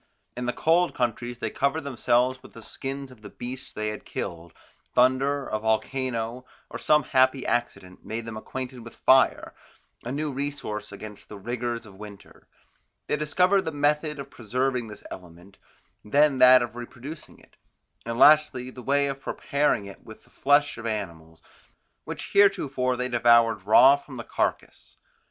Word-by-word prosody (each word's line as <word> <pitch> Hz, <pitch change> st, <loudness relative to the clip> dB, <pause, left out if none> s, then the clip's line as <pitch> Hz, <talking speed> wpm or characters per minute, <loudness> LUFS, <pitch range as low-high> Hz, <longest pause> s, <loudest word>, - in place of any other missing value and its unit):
In 125 Hz, 0 st, -4 dB
the -, -, +1 dB
cold 170 Hz, +6 st, +2 dB
countries 120 Hz, -1 st, -2 dB
they 115 Hz, -2 st, -4 dB
covered 140 Hz, +4 st, 0 dB
themselves 130 Hz, -1 st, 0 dB
with -, -, -15 dB
the 115 Hz, -, -11 dB
skins 135 Hz, +2 st, -6 dB
of 120 Hz, -4 st, -17 dB
the 105 Hz, -, -10 dB
beasts 125 Hz, +5 st, -7 dB
they 105 Hz, 0 st, -3 dB
had 105 Hz, -, -7 dB
killed; 85 Hz, -2 st, -6 dB, 0.4 s
thunder, 135 Hz, +3 st, +2 dB
a 110 Hz, -, -3 dB
volcano, 115 Hz, +2 st, -2 dB, 0.3 s
or -, -, -6 dB
some 150 Hz, -1 st, +3 dB
happy 130 Hz, +1 st, +2 dB
accident 90 Hz, -6 st, -3 dB
made 115 Hz, +1 st, -5 dB
them 115 Hz, -1 st, -7 dB
acquainted 130 Hz, +3 st, -6 dB
with 115 Hz, 0 st, -12 dB
fire, 130 Hz, 0 st, +3 dB, 0.5 s
a 120 Hz, -, -5 dB
new 150 Hz, +2 st, -2 dB
resource 130 Hz, -7 st, -5 dB
against 105 Hz, 0 st, -10 dB
the 105 Hz, -, -9 dB
rigours 120 Hz, +2 st, -4 dB
of 100 Hz, -, -14 dB
winter: 100 Hz, 0 st, -13 dB, 0.6 s
they -, -, 0 dB
discovered 180 Hz, +6 st, +2 dB
the 160 Hz, -, -4 dB
method 150 Hz, +1 st, 0 dB
of 140 Hz, 0 st, -8 dB
preserving 125 Hz, +1 st, -2 dB
this 105 Hz, -, -11 dB
element, 90 Hz, +2 st, -12 dB, 0.4 s
then 140 Hz, +4 st, +3 dB
that 125 Hz, 0 st, +8 dB
of 120 Hz, 0 st, -7 dB
reproducing 125 Hz, +5 st, -9 dB
it, -, -, -23 dB, 0.5 s
and 115 Hz, 0 st, -4 dB
lastly 145 Hz, -3 st, +5 dB
the 125 Hz, -, -10 dB
way 140 Hz, +3 st, +2 dB
of 140 Hz, -1 st, -4 dB
preparing 140 Hz, -9 st, 0 dB, 0.2 s
with 110 Hz, -, -13 dB
it -, -, -31 dB
the -, -, -25 dB
flesh 145 Hz, -2 st, +2 dB
of 115 Hz, -, -5 dB
animals, 85 Hz, -7 st, -6 dB, 0.6 s
which -, -, -7 dB
heretofore 140 Hz, -11 st, +3 dB
they 125 Hz, +1 st, -1 dB
devoured 115 Hz, -4 st, +3 dB
raw 130 Hz, +6 st, +8 dB
from 140 Hz, -2 st, -11 dB
the 115 Hz, -, -6 dB
carcass. -, -, -3 dB
125 Hz, 165 wpm, -26 LUFS, 110-140 Hz, 0.6 s, that